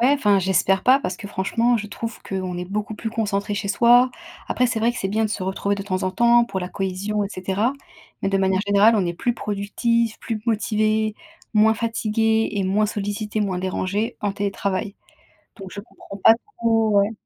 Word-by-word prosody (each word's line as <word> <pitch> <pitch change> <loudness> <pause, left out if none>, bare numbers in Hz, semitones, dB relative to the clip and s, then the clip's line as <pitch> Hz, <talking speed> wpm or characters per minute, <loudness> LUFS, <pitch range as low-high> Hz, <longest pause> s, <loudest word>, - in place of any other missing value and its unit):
Ouais, 245 - +4
enfin, 205 -8 +3
j'espère 190 +1 +2
pas 260 +2 +5
parce 185 -8 -4
que 205 - -8
franchement, 230 +6 +1
je 210 -2 -4
trouve 230 +2 -6
qu'on 185 -2 -4
est 180 - -3
beaucoup 210 +3 -4
plus 225 +1 -5
concentré 205 -2 -1
chez 200 -1 -3
soi. 245 +3 +5 0.4
Après, 250 - +2
c'est 225 -2 -2
vrai 235 +2 +3
que 245 - -6
c'est 195 - -1
bien 220 +2 0
de 210 - -2
se 205 - -3
retrouver 200 +1 -1
de 200 - -4
temps 185 -2 -2
en 185 - 0
temps 235 +4 +4
pour 195 -5 -4
la 180 -1 -4
cohésion, 200 +2 -2
et 200 - -2
cetera, 195 +6 -1 0.5
mais - - 0
de 195 - +1
manière 190 0 +2
générale, 205 +3 +5
on 190 -4 +1
est 170 - -1
plus 240 +7 -1
productif, 225 +3 -1
plus 220 -2 -4
motivé, 215 -1 +1 0.4
moins 220 +1 +5
fatigué 225 -1 0
et 200 -2 -1
moins 210 +3 +2
sollicité, 210 +1 -3
moins 190 -3 -1
dérangé, 190 +3 -2
en 205 -1 -1
télétravail, 200 0 -2 0.6
donc 195 -3 -9
je 200 - -6
comprends 200 -2 -12
pas 225 - +8 0.3
trop 225 -1 +2
ouais. 205 +3 0
210 Hz, 205 wpm, -22 LUFS, 195-225 Hz, 0.6 s, pas